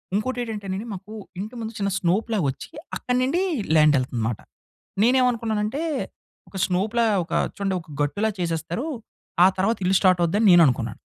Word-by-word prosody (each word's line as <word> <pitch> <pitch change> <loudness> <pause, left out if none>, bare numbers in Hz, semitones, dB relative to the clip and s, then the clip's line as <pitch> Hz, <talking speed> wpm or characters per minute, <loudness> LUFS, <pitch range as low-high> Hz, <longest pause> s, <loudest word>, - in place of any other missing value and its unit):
ఇంకోటేటంటేనండి 215 -3 -3
మాకూ, 195 +3 -9 0.3
ఇంటి 215 +5 -5
ముందు 220 +1 -5
చిన్న 200 0 0
స్నోప్‌లా 210 +5 0
ఒచ్చి, 135 - -7 0.3
అక్కడి 250 0 -1
నుండి 325 +8 +1 0.3
ల్యాండెళ్తుంది 140 -6 +3
మాట. 115 - -3 0.6
నేనేమనుకున్నానంటే, 235 +1 +1 0.7
ఒక - - -17
స్నోప్‌లా 215 +6 +1 0.2
ఒక - - -8 0.2
చూడండొక 185 -5 -3
గట్టులా 205 +9 0
చేసేస్తారు. 165 - -2 0.6
ఆ - - +8
తర్వాత 200 +5 +1
ఇల్లు 190 +1 +3
స్టార్టవుద్దని 185 +3 +3
నేననుకున్నాను. 130 -10 +4
200 Hz, 125 wpm, -24 LUFS, 170-230 Hz, 0.7 s, ఆ